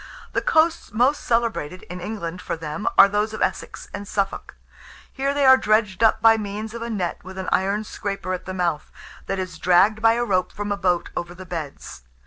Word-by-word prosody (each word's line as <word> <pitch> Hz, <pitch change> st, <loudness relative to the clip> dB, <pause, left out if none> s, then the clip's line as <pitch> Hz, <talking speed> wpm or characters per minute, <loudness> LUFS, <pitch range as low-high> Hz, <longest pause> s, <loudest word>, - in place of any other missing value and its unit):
The -, -, +1 dB
coasts 320 Hz, -2 st, +2 dB
most 250 Hz, +7 st, +2 dB
celebrated, 230 Hz, -8 st, -1 dB
in 180 Hz, +1 st, -8 dB
England, 180 Hz, -3 st, -5 dB
for -, -, -4 dB
them, 160 Hz, +3 st, -5 dB
are -, -, +9 dB
those 210 Hz, +2 st, -1 dB
of -, -, -7 dB
Essex -, -, -3 dB
and 200 Hz, 0 st, -6 dB
Suffolk. 195 Hz, -1 st, -3 dB, 0.6 s
Here 275 Hz, +1 st, -1 dB
they 285 Hz, 0 st, +1 dB
are 260 Hz, 0 st, +8 dB
dredged 215 Hz, -4 st, +1 dB
up 225 Hz, 0 st, +4 dB
by 225 Hz, 0 st, +7 dB
means 210 Hz, +1 st, -5 dB
of 235 Hz, -, -6 dB
a 235 Hz, -, -4 dB
net 185 Hz, -6 st, -3 dB
with 190 Hz, +1 st, -10 dB
an 190 Hz, -, -3 dB
iron 200 Hz, +3 st, +1 dB
scraper 195 Hz, -3 st, -4 dB
at 185 Hz, -, -5 dB
the 185 Hz, -, -5 dB
mouth, 170 Hz, -5 st, -1 dB, 0.4 s
that 195 Hz, -, -2 dB
is 185 Hz, -4 st, -5 dB
dragged 190 Hz, +5 st, +4 dB
by 225 Hz, 0 st, +5 dB
a 240 Hz, +1 st, 0 dB
rope 185 Hz, -4 st, 0 dB
from 205 Hz, 0 st, -5 dB
a -, -, +1 dB
boat 180 Hz, -3 st, 0 dB
over 175 Hz, +1 st, -4 dB
the 185 Hz, +1 st, -10 dB
beds. 160 Hz, -, -7 dB
200 Hz, 210 wpm, -23 LUFS, 180-225 Hz, 0.6 s, are